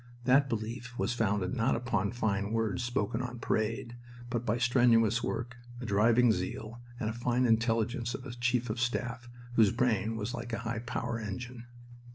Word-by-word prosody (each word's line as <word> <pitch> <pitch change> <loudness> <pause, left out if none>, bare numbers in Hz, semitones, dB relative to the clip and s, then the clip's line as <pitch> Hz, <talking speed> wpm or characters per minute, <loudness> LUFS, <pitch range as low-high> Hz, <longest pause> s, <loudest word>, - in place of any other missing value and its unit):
That 135 +2 +4
belief 115 +2 -4
was 100 +5 0
founded 105 -5 0
not 120 +1 +2
upon 120 -4 0
fine 105 -3 -1
words 115 +1 0
spoken 115 -1 -1
on 125 -1 -5
parade, 115 +2 -1 0.3
but 120 0 -2
by 110 +3 +2
strenuous 115 -2 +4
work, 120 +1 -3 0.2
a 125 - -5
driving 115 +3 +4
zeal, 110 +4 -4 0.2
and 110 - -1
the - - -3
fine 120 +2 +1
intelligence 115 +1 +1
of 130 - -8
a 130 - -6
chief 125 -1 0
of 115 - -4
staff 120 -1 -2 0.2
whose 110 -4 +5
brain 115 -3 +1
was 110 +2 -3
like 120 0 -5
a - - 0
high 115 0 -2
power 115 0 -3
engine. 120 +3 -6
115 Hz, 175 wpm, -31 LUFS, 110-125 Hz, 0.3 s, whose